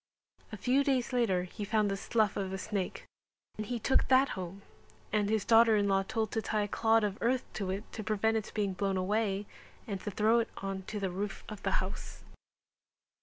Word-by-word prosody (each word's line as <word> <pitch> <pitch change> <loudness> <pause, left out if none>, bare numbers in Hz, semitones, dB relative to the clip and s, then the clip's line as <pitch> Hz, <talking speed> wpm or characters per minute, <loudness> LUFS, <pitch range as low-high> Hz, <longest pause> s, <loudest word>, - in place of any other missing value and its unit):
A 215 - -5
few 255 +7 +2
days 265 -3 0
later 205 -8 +2
he 185 +3 -7
found 210 0 +1
the - - 0
slough 215 +1 +1
of 190 -1 -2
a 190 - -3
snake 195 -1 -3 0.5
and 215 -1 -5
he 245 - -2
took 265 +4 +2
that 265 +1 +5
home 190 +2 -6 0.5
and 210 -1 +2
his 220 -1 +1
daughter 225 -1 +6
in 205 -1 +2
law 195 -1 +3
told 220 +2 -2
to 225 - 0
tie 215 -1 0
a - - -2
clod 225 +2 +3
of 205 -1 -1
earth 250 +2 +2
to 195 -3 -3
it 195 +3 -2
to 220 - -5
prevent 220 +1 +1
its 220 -1 -2
being 205 -3 -1
blown 195 +1 -1
away, 200 +1 0 0.4
and 200 -5 -4
to - - -4
throw 215 +4 +3
it 230 - -1
on 195 -1 -4
to 210 - -4
the 190 -2 -2
roof 195 +2 -4
of 215 -2 -8
the - - -1
house. - - -8
210 Hz, 215 wpm, -31 LUFS, 195-225 Hz, 0.5 s, daughter